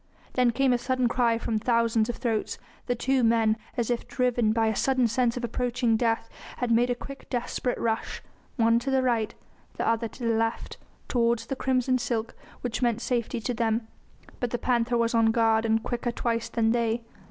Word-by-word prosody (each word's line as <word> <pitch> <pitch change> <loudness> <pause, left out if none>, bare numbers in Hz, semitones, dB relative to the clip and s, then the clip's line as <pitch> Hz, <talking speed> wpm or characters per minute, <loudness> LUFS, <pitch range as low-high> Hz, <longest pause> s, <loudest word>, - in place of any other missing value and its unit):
Then 250 -1 +3
came 260 +2 +2
a 245 - +1
sudden 255 0 +1
cry 235 -1 +2
from 225 -1 -1
thousands 230 -1 +2
of 240 - -2
throats; 225 -4 -2 0.3
the 245 - +1
two 260 +2 +1
men, 225 -1 +3 0.2
as 240 0 0
if 240 - -2
driven 245 -4 +1
by 225 0 +2
a 220 -1 +1
sudden 260 0 +2
sense 235 +1 +1
of 245 - -4
approaching 240 0 0
death, 225 0 0 0.3
had 245 -2 -1
made 240 +2 +3
a 245 - +1
quick 275 +3 -10
desperate 245 0 -2
rush, 225 -1 -2 0.3
one 230 -1 +3
to 270 - -4
the 265 -1 +2
right 230 -4 0 0.4
the - - -1
other 230 0 +1
to 245 - -11
the 230 -1 +2
left, 225 +1 -1 0.3
towards 235 -1 +1
the 270 - -3
crimson 255 -1 +1
silk 230 -2 -2 0.3
which 245 -1 -3
meant 235 -2 +1
safety 240 -1 -1
to 245 - -2
them. 225 -1 0 0.5
But 245 - -1
the 240 - -1
panther 240 -1 +1
was 230 0 +1
on 230 -1 +4
guard 225 0 +3
and 225 0 +1
quicker 240 0 -2
twice 230 -1 -2
than 225 -1 +1
they. 235 0 0
235 Hz, 200 wpm, -27 LUFS, 225-245 Hz, 0.5 s, on